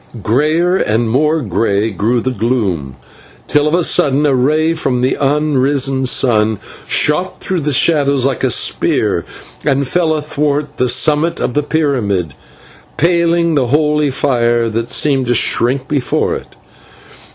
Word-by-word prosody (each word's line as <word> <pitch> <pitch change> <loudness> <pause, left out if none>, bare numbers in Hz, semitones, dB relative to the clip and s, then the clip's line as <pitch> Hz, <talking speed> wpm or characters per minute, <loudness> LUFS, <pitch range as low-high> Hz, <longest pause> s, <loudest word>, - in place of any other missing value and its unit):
Greyer 155 - +1
and 110 - 0
more 150 +5 +1
grey 105 +1 -1
grew 115 +5 -1
the 130 - -2
gloom, 100 - -2 0.5
till 150 0 +1
of 150 - +1
a 175 - +1
sudden 145 -1 +2
a 145 - +2
ray 155 +6 +1
from 130 -6 -2
the 130 - +1
unrisen 135 -2 +1
sun 110 -4 +2 0.3
shot 180 +5 0
through 185 -2 -3
the 150 -1 -2
shadows 140 -2 +2
like 135 -3 -1
a - - +2
spear - - 0 0.4
and 140 -1 0
fell 165 +1 0
athwart 150 -1 -2
the 125 - 0
summit 150 +6 +1
of 125 - -2
the 150 - +1
pyramid, 120 - -1 0.6
paling 170 0 +1
the 135 -5 +1
holy 150 +2 +1
fire, 120 -3 0
that 115 +1 -3
seemed 135 -4 +1
to 120 - +1
shrink 130 +3 +1
before 140 -4 -1
it. - - -8
140 Hz, 145 wpm, -14 LUFS, 120-150 Hz, 0.6 s, sudden